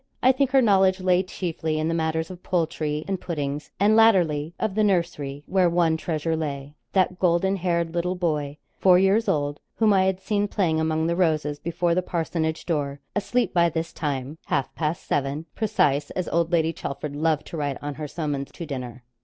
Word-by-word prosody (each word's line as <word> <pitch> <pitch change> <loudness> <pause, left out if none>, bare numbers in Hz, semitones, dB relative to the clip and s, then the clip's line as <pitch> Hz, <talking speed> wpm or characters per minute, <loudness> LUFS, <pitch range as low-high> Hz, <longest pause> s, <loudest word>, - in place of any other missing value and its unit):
I 255 - +7
think 265 0 +1
her 265 -1 +4
knowledge 190 -3 +4
lay 185 -1 +3
chiefly 165 -4 -3
in 155 +1 0
the 165 - 0
matters 160 +1 -1
of 180 -1 -10
poultry, 155 -3 -1
and 195 -2 -2
puddings, 145 -3 -3
and 210 +2 +4
latterly, 170 -8 +3
of 215 -3 -1
the 215 +2 +2
nursery, 170 -8 -1
where 185 -2 +3
one 170 -1 +2
treasure 160 0 -2
lay 145 -2 -4 0.2
that 185 -1 +2
golden 185 +2 +2
haired 170 -2 -1
little 175 +1 -1
boy, 150 -5 -1 0.2
four 185 -2 +6
years 195 +4 +3
old, 145 -1 0 0.2
whom 220 -2 +3
I 190 -1 +4
had 190 -1 0
seen 205 0 0
playing 170 -6 0
among 160 0 0
the 170 +1 +1
roses 155 -4 +1
before 170 +1 0
the 180 - +2
parsonage 160 -2 -2
door, 145 -4 -2 0.2
asleep 240 +4 0
by 170 -2 +4
this 165 0 -4
time 145 0 -3
half 135 - -1
past 160 +1 -2
seven, 145 +2 -1
'precise,' 145 -9 +1
as 185 -2 -3
old 170 0 +1
Lady 165 -1 +2
Chelford 145 0 -5
loved 155 0 0
to 165 - -7
write 145 -3 -2
on 145 0 -5
her 150 +1 -6
summons 145 -3 -3
to 170 - -6
dinner. 125 -4 -6
165 Hz, 195 wpm, -24 LUFS, 150-185 Hz, 0.2 s, I